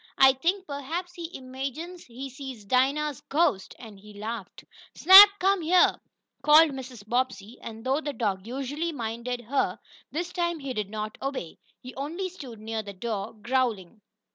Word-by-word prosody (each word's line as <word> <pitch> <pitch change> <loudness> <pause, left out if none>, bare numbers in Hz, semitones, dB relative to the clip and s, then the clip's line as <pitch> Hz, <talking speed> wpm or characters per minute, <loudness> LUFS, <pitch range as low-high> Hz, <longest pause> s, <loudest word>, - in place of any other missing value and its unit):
I 265 0 +7
think 355 +9 -1
perhaps 320 +5 -5
he 340 -2 -7
imagines 275 +7 -6
he 255 +3 -8
sees 260 -4 -9
Dinah's 275 +5 +1
ghost!" 280 - 0
and 215 -4 -12
he 210 +1 -14
laughed. 220 +3 -7 0.3
"Snap, 385 +3 +11
come 385 0 +2
here!" 350 +3 +4 0.4
called 305 +2 +7
Mrs. 255 -6 -9
Bobbsey, 245 -2 -2
and, 225 +1 -9
though 270 +4 +1
the 295 - -3
dog 210 -5 -2
usually 275 +6 -3
minded 240 -2 -4
her, 255 +5 -1 0.3
this 345 +3 -4
time 345 -1 -1
he 275 -3 -5
did 210 -4 -3
not 215 0 -5
obey. 270 - -5 0.2
He 255 0 -9
only 330 +8 -4
stood 265 - -10
near 220 +1 -4
the 200 -1 -9
door, 205 +1 -4
growling. 235 -6 -1
260 Hz, 160 wpm, -27 LUFS, 225-310 Hz, 0.4 s, Snap